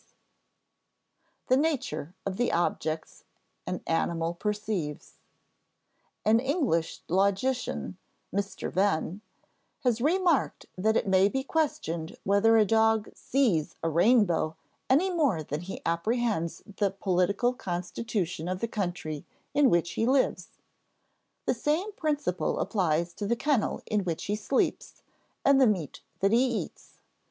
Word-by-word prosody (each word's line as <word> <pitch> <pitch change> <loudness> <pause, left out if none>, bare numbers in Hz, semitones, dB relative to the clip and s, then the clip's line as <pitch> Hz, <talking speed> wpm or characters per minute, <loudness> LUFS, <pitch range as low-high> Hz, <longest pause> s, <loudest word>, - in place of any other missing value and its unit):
[Sidenote: - - -43
The 255 - +5
nature 255 - -1
of 195 -1 -3
the 245 - +1
objects 160 -2 -2 0.4
an - - -3
animal 165 0 0
perceives] 205 -5 -3 1.1
An 220 +2 +5
English 260 - 0
logician 200 +2 0 0.3
(Mr. 200 0 -3
Venn) 190 0 +1 0.6
has 240 -3 +1
remarked 340 0 +2
that 220 +4 +2
it - - -1
may 190 +1 +4
be 265 +4 -2
questioned 220 - -2
whether 200 +3 +4
a 215 - +5
dog 220 0 +2
sees 220 - 0
a 165 - +1
rainbow 175 -3 +3 0.3
any 325 +9 +4
more 280 - +1
than 150 +1 -4
he 185 +2 -7
apprehends 185 0 -1
the 205 -2 +2
political 195 +5 +1
constitution 180 -3 -3
of 185 0 -2
the 230 - -1
country 175 -8 -3 0.3
in 285 -2 +5
which 170 0 +2
he 225 - 0
lives. 265 +1 +2 1.0
The - - +2
same 305 - 0
principle 295 - -1
applies 170 -4 0
to 205 - -4
the 235 - +2
kennel 265 -3 0
in 210 -2 0
which 170 -3 -3
he 205 - 0
sleeps 215 +5 -1 0.4
and 275 -1 +6
the 260 - +7
meat 185 -9 -1 0.2
that 195 +1 +3
he 235 +3 +5
eats. 245 -4 -4
205 Hz, 130 wpm, -28 LUFS, 175-250 Hz, 1.1 s, the